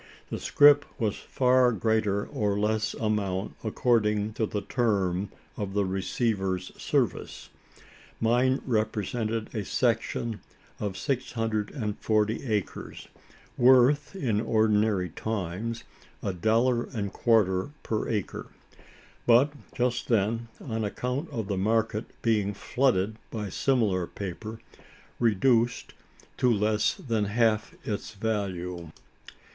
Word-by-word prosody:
The - - -3
scrip 145 0 +6 0.2
was 110 -4 0
for 125 -1 +3
greater 105 -1 +1
or 100 -1 -1
less 105 +1 0
amount, 105 -3 -1
according 110 -2 +1
to 110 0 -1
the 105 - -3
term 100 -5 0 0.3
of 100 -1 -4
the 100 -1 +2
receiver's 95 -1 -1
service. - - -1 0.7
Mine 125 +3 +2
represented 110 -1 -1
a 105 - -1
"section" 115 0 -1 0.4
of 100 -2 -3
six 135 -3 -2
hundred 110 -2 -1
and 105 -7 -4
forty 110 0 +1
acres 105 -3 -3 0.5
worth 130 +6 +5
in 115 - 0
ordinary 110 -4 +2
times, 110 +4 -4 0.4
a 100 - -1
dollar 115 +6 +2
and 100 -6 -4
quarter 105 -2 +2
per 110 -1 -2
acre; 105 -4 -3 0.8
but 125 +5 +5 0.2
just 125 -1 -1
then 115 +1 +1
on 115 -4 -3
account 125 +9 -3
of 115 -7 -4
the 100 -2 -1
market 110 +2 +1 0.2
being 105 -3 +1
flooded 110 -4 +1
by 105 -3 -4
similar 100 -7 +1
paper 105 +3 -6 0.6
reduced 115 +1 +2 0.4
to 125 -2 +3
less 105 0 +2
than 115 -5 -1
half 110 +1 +1
its 105 0 -4
value. 90 -5 -3
110 Hz, 115 wpm, -27 LUFS, 100-120 Hz, 0.8 s, scrip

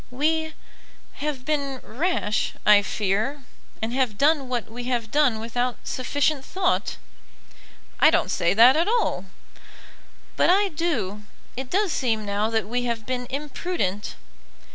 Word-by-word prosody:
"We 315 +4 0 0.7
have 285 -4 -3
been 280 -3 -1
rash, 250 - -1
I 210 -1 +7
fear; 215 +8 -1 0.4
and 225 +2 -2
have 255 -5 0
done 285 -1 +2
what 245 -3 -2
we 240 +2 -7
have 240 -3 -2
done 280 -6 +3
without 245 +2 -2
sufficient 285 +2 0
thought." 370 +3 -1 1.0
"I - - +7
don't 335 +2 +1
say 170 +3 +1
that 240 +5 +8
at 330 +4 +2
all." 435 - 0 1.1
"But - - +4
I 395 +2 +4
do. 280 - -2 0.3
It 260 +1 -5
does 395 +2 +1
seem 225 -5 0
now 205 +2 0
that 225 -2 -1
we 245 +2 -1
have 230 -2 -2
been 250 0 -3
imprudent." 275 - -3
255 Hz, 140 wpm, -24 LUFS, 220-300 Hz, 1.1 s, that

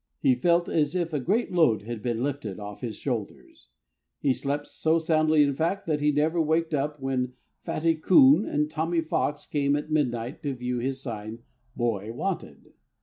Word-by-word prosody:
He 135 -3 +4
felt 170 +7 +2
as 150 0 0
if 170 -2 -1
a 150 - +1
great 205 - 0
load 140 - +3
had 115 0 -6
been 120 +1 -1
lifted 130 -9 -3
off 105 0 -8
his 115 -4 -4
shoulders. 115 -6 -5 0.5
He 135 - +2
slept 145 +2 -3
so 160 +1 +1
soundly, 155 -2 +3
in 140 -1 +1
fact, 170 +7 -1
that 150 -3 -1
he 150 0 +3
never 155 +3 +1
waked 160 +1 +1
up 145 +1 0
all 135 - -8
when 130 -1 -1 0.3
Fatty 165 +1 +1
Coon 160 0 +6
and 150 -5 0
Tommy 165 +2 -1
Fox 150 -2 -2
came 140 -1 +1
at 150 +1 -4
midnight 125 -4 -1
to 140 -4 -3
view 125 0 -3
his 135 +2 -3
sign, 110 -1 -6 0.3
"Boy 115 -3 -1
Wanted." 185 +10 -5
145 Hz, 185 wpm, -26 LUFS, 125-160 Hz, 0.5 s, Coon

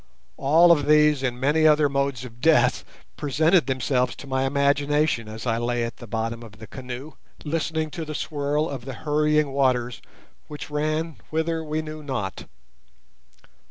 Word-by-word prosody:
All 165 +5 +5
of 145 -4 +3
these 150 -2 +5
and 125 -2 -2
many 150 +4 +3
other 150 -1 +5
modes 140 -2 -1
of 120 -1 -13
death 130 -5 +3 0.3
presented 155 +2 +2
themselves 130 -1 0
to - - -10
my 130 0 0
imagination 140 -2 +1
as 110 +2 -8
I 115 -1 0
lay 120 0 -1
at 115 - -5
the 120 - -11
bottom 115 +2 -3
of 110 -2 -12
the 110 - -10
canoe, 130 +4 -8 0.3
listening 160 0 -2
to 165 - -5
the 155 -1 -6
swirl 145 +1 -1
of 135 -5 -6
the 135 - -5
hurrying 150 -1 +2
waters 125 -3 0 0.5
which 150 0 -8
ran 155 +2 -1
whither 160 +1 -1
we 155 0 -2
knew 155 0 -7
not. 130 -10 -4
140 Hz, 160 wpm, -24 LUFS, 125-155 Hz, 0.5 s, All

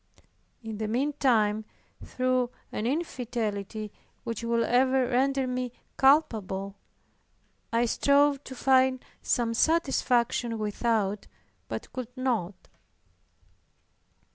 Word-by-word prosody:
In 220 -2 -6
the 215 - -2
meantime, 235 -4 +1 0.4
through 255 -1 0 0.2
an 215 - -2
infidelity 225 - -3 0.3
which 230 0 -4
will 230 0 +1
ever 255 +2 +3
render 265 +2 +1
me 250 -1 -2 0.2
culpable, 210 -9 +2 1.0
I 230 +1 +2
strove 280 +3 +3
to 260 - -8
find 260 0 +3 0.2
some 235 -1 0
satisfaction 245 -5 +1
without, 210 -1 -1 0.4
but 110 -1 -6
could 255 -2 -4
not. 215 -8 -2
240 Hz, 90 wpm, -28 LUFS, 220-260 Hz, 1.0 s, ever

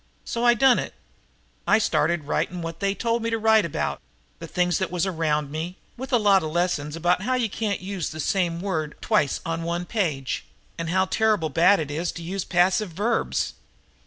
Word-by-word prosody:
So 235 - -3
I 240 0 +6
done 255 +1 +5
it. - - -5 0.7
I - - +6
started 170 -2 +1
writing 175 +4 -2
what 165 0 -6
they 200 0 0
told 230 +3 0
me 230 - -1
to 225 - 0
write 220 -2 +4
about, 165 - -2 0.4
the - - -7
things 180 -2 +1
that 190 - -1
was 180 0 -1
around 155 -5 -1
me, 165 +4 -4 0.2
with 265 +3 -7
a 245 - +5
lot 200 -3 +4
of 155 - -3
lessons 155 -3 -1
about 175 +2 +1
how 255 +6 0
you 245 -3 +1
can't 210 -5 -2
use 190 -3 -3
the 155 - -8
same 170 0 0
word 160 -6 -2
twice 145 -3 +1
on 165 0 -2
one 170 +1 -2
page, 160 - -2 0.3
and 165 0 -4
how 185 +2 +2
terrible 210 -5 +1
bad 175 +7 +4
it 150 -2 -3
is 165 +4 -2
to 170 - -8
use 190 +4 -3
too - - -19
many 175 -1 +4
passive 190 +2 0
verbs." 220 +6 0
180 Hz, 210 wpm, -24 LUFS, 165-205 Hz, 0.7 s, I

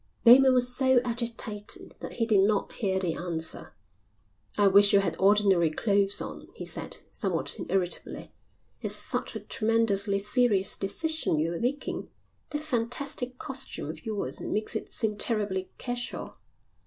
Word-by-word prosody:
Bateman 255 +2 +8
was 250 0 +3
so 260 -1 +4
agitated 230 -3 -4
that - - -7
he 230 - 0
did 215 -3 +3
not 205 0 +1
hear 190 -4 -1
the 180 -3 0
answer. 165 -2 -2 0.8
"I 205 - +4
wish 200 +1 +6
you 200 - +7
had 195 - -1
ordinary 195 -4 +4
clothes 200 +4 +2
on," - - -7
he - - -7
said, - - -3
somewhat - - -2
irritably. 185 -2 -1 0.5
"It's - - +1
such - - -3
a - - -5
tremendously 215 -3 +1
serious 205 -1 +2
decision 315 - -1
you're 165 +2 -1
taking. 260 +5 -3 0.4
That 295 -1 -3
fantastic 250 -1 -1
costume 265 - -4
of - - -13
yours 215 -3 -4
makes 215 +2 -2
it 220 - -4
seem 215 -3 -2
terribly 205 -5 -1
casual." 245 -1 -5
210 Hz, 140 wpm, -28 LUFS, 195-245 Hz, 0.8 s, Bateman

